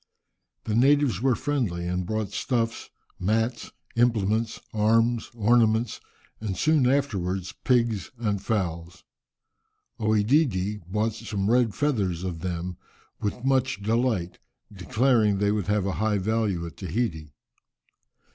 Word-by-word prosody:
The 110 - -3
natives 130 -3 +3
were 130 -1 +3
friendly, 110 -12 -1
and 90 0 -2
brought 110 -2 -2
stuffs, 115 -1 -2 0.3
mats, 110 +5 0 0.3
implements, 115 -1 +1
arms, 115 +2 +2
ornaments, 115 0 +2 0.4
and 105 -4 -4
soon 155 -5 +3
afterwards 95 -10 -1
pigs 115 -6 +1
and 105 -4 -1
fowls. 85 -5 -3 1.0
OEdidi 105 - +2
bought 105 +4 0
some 100 0 -2
red 120 -4 +3
feathers 100 - 0
of 90 -3 -4
them 90 0 -4 0.4
with 105 +5 -3
much 130 -5 +1
delight, 110 -5 0 0.3
declaring 110 +2 +2
they 100 +1 +2
would 105 -3 -1
have 105 -2 +1
a 100 - 0
high 110 -1 +2
value 100 -3 0
at 85 - -9
Tahiti. 85 - -3
110 Hz, 120 wpm, -26 LUFS, 95-120 Hz, 1.0 s, natives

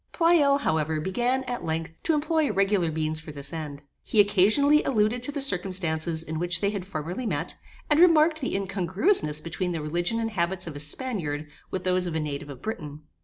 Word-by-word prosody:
Pleyel, 330 -5 +4
however, 155 - 0
began, 240 +10 0
at 245 -1 -5
length, 165 +1 -3
to 325 - +1
employ 310 0 +1
regular 195 -4 +1
means 155 0 -2
for 155 0 -9
this 145 0 -7
end. 150 -3 -6 0.2
He 215 - -1
occasionally 210 +10 +5
alluded 225 -1 +1
to 255 - -1
the 285 -1 -2
circumstances 175 -7 +1
in 160 -1 -5
which 175 0 +2
they 200 +2 0
had 195 -3 -5
formerly 180 +7 -4
met, - - -2 0.3
and 295 0 +3
remarked 320 -2 +5
the 265 - -2
incongruousness 190 - +1
between 175 +2 -3
the 165 - -3
religion 175 +8 -1
and 225 -1 -2
habits 185 -1 -1
of 165 -3 -7
a - - -6
Spaniard, 155 - -2 0.2
with 185 - -4
those 185 -1 +1
of 165 - -4
a - - 0
native 145 -1 -4
of 135 -3 -10
Britain. 150 -9 -6
185 Hz, 195 wpm, -26 LUFS, 160-245 Hz, 0.3 s, occasionally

